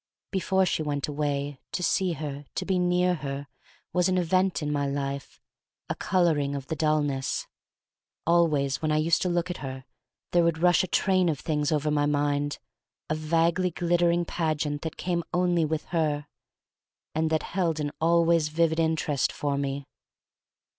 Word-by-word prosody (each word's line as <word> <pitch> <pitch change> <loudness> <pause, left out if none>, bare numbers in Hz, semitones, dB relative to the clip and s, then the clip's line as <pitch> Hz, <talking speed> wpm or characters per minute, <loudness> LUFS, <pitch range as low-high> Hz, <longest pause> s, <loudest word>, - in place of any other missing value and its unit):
Before 190 0 +2
she 170 - 0
went 145 -2 -2
away, 145 -2 -2
to 180 - -2
see 185 0 +2
her, 145 -2 -5
to - - -2
be 190 -2 +1
near 180 0 +2
her, 140 -3 -4 0.5
was 180 +1 +3
an 185 - +2
event 185 0 +1
in 150 - -1
my 145 -1 0
life 140 0 -4 0.3
— - - -51
a - - +1
coloring 155 -6 +1
of 135 -1 -5
the 160 - -3
dullness. 145 -3 0 0.8
Always 155 -5 +2
when 155 -1 0
I 150 - +2
used 160 +2 +2
to 180 - +1
look 175 +1 0
at 175 - -5
her 130 -1 -7 0.5
there 175 -1 +4
would 170 -1 +2
rush 175 +2 +4
a - - -2
train 185 -1 +2
of 150 -4 -1
things 150 -2 -1
pver 150 -1 +1
my 145 -1 +2
mind, 145 0 0 0.5
a - - +4
vaguely 165 +3 +1
glittering 175 0 +1
pageant 155 -3 -1
that 160 - -5
came 175 -1 -1
only 175 -2 +2
with 155 0 -2
her, 150 -3 +1 0.9
and 160 +1 +1
that 160 -1 +1
held 170 -4 0
an 145 -1 -2
always 170 -1 +4
vivid 160 +1 +1
interest 160 -4 +1
for 145 -1 -2
me. 140 0 -2
155 Hz, 170 wpm, -27 LUFS, 145-175 Hz, 0.9 s, there